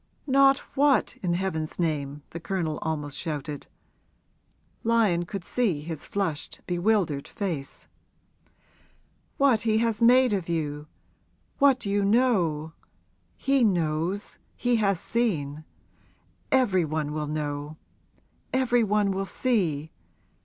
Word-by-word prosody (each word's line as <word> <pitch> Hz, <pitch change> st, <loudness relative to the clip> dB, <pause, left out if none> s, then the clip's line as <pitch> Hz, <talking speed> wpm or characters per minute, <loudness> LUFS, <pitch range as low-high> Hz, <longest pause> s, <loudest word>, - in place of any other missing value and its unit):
'Not 275 Hz, 0 st, +5 dB, 0.2 s
what, 280 Hz, -1 st, +3 dB
in 175 Hz, -2 st, 0 dB
heaven's 160 Hz, -4 st, -3 dB
name?' 150 Hz, -4 st, -2 dB
the 170 Hz, -, -6 dB
Colonel 165 Hz, -4 st, -2 dB
almost 150 Hz, -3 st, -3 dB
shouted. 150 Hz, -3 st, -4 dB, 1.2 s
Lyon 215 Hz, -7 st, +2 dB
could 195 Hz, -1 st, -6 dB
see 205 Hz, -12 st, 0 dB
his 160 Hz, -1 st, -6 dB
flushed, 165 Hz, -7 st, -3 dB
bewildered 175 Hz, -5 st, 0 dB
face. 165 Hz, -9 st, -5 dB, 1.5 s
'What 265 Hz, -6 st, +4 dB
he 220 Hz, -1 st, +2 dB
has 230 Hz, -1 st, 0 dB
made 250 Hz, 0 st, +6 dB
of 185 Hz, -4 st, -2 dB
you 150 Hz, -3 st, -2 dB, 0.7 s
what 275 Hz, -4 st, +4 dB
you 200 Hz, 0 st, +1 dB
know! 190 Hz, -9 st, +2 dB, 0.6 s
He 275 Hz, -2 st, +2 dB
knows 175 Hz, 0 st, 0 dB, 0.2 s
he 245 Hz, -1 st, +1 dB
has 200 Hz, -5 st, +1 dB
seen. 155 Hz, -12 st, -1 dB, 0.9 s
Every 215 Hz, -9 st, +3 dB
one 155 Hz, -1 st, -2 dB
will 150 Hz, -1 st, -2 dB
know 150 Hz, 0 st, -4 dB, 0.7 s
every 245 Hz, -2 st, +2 dB
one 210 Hz, -1 st, +2 dB
will 195 Hz, 0 st, -2 dB
see. 165 Hz, -, 0 dB
185 Hz, 110 wpm, -26 LUFS, 155-230 Hz, 1.5 s, made